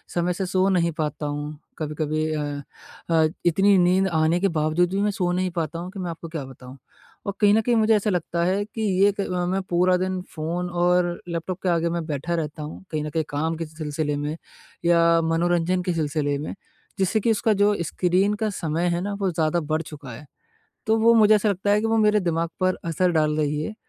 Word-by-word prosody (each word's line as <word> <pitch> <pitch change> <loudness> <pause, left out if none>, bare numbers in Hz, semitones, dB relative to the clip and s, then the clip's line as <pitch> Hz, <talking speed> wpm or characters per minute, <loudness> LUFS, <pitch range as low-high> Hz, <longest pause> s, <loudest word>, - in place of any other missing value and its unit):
समय 175 +1 +1
से 190 +2 -3
सो 185 +1 +1
नहीं 170 -3 +2
पाता 150 0 -2
हूँ, 145 +1 -4 0.2
कभी-कभी 155 0 -2
अ 150 -1 -1 0.7
अ, 160 -1 +4 0.2
इतनी 195 +4 +4
नींद 185 +2 +3
आने 160 0 +2
के 195 - +2
बावजूद 155 +3 +2
भी 195 - 0
मैं 210 0 +2
सो 180 -3 -1
नहीं 185 +1 0
पाता 165 -2 -3
हूँ 180 +2 -6
कि 195 - -8
मैं 180 -2 -3
आपको 165 0 -8
क्या 160 -3 -4
बताऊँ? 130 0 -12 0.5
और 200 - -2
कहीं 205 -1 +6
न 220 - +4
कहीं 240 +2 +1
मुझे 220 0 +4
ऐसा 210 0 +1
लगता 170 -2 -1
है 190 +3 +1
कि 220 +1 -7 0.2
ये 205 - +6
क 200 - -1 0.2
मैं 190 +1 0
पूरा 180 +1 +3
दिन 185 0 -2
फ़ोन 170 +3 -3
और 175 0 +2 0.2
लैपटॉप 170 +2 -4
के 185 - +1
आगे 170 -1 +1
मैं 170 -1 -2
बैठा 155 +2 -2
रहता 155 -2 -4
हूँ 150 +5 -8
कहीं 155 -2 -2
न 150 - -4
कहीं 160 +1 -1
काम 160 +3 -1
के 165 - -3
सिलसिले 155 -1 -3
में 145 +2 -3 0.5
या 170 0 +5 0.2
मनोरंजन 170 +2 +1
के 180 -1 -1
सिलसिले 145 -2 -1
में 145 - -5 0.5
जिससे 195 +3 +2
कि 225 +2 +1
उसका 220 0 +2
जो 205 +1 +3
स्क्रीन 180 +5 +1
का 220 - +1
समय 170 -3 -2
है 175 - -2
ना 205 +1 -3
वो 190 -2 +1
ज़्यादा 160 +1 +1
बढ़ 155 +1 -1
चुका 145 -5 -10
है, 120 +6 -10 0.6
तो 220 +1 +3
वो 230 +1 +5
मुझे 215 -1 +6
ऐसा 210 0 +2
लगता 200 +1 0
है 210 - +4
कि 225 - -1
वो 225 0 +1
मेरे 210 -1 +4
दिमाग 170 -1 -1
पर 185 0 +1
असर 175 +2 +1
डाल 155 -2 +2
रही 150 0 0
है। 215 - -5
175 Hz, 225 wpm, -24 LUFS, 155-190 Hz, 0.7 s, कहीं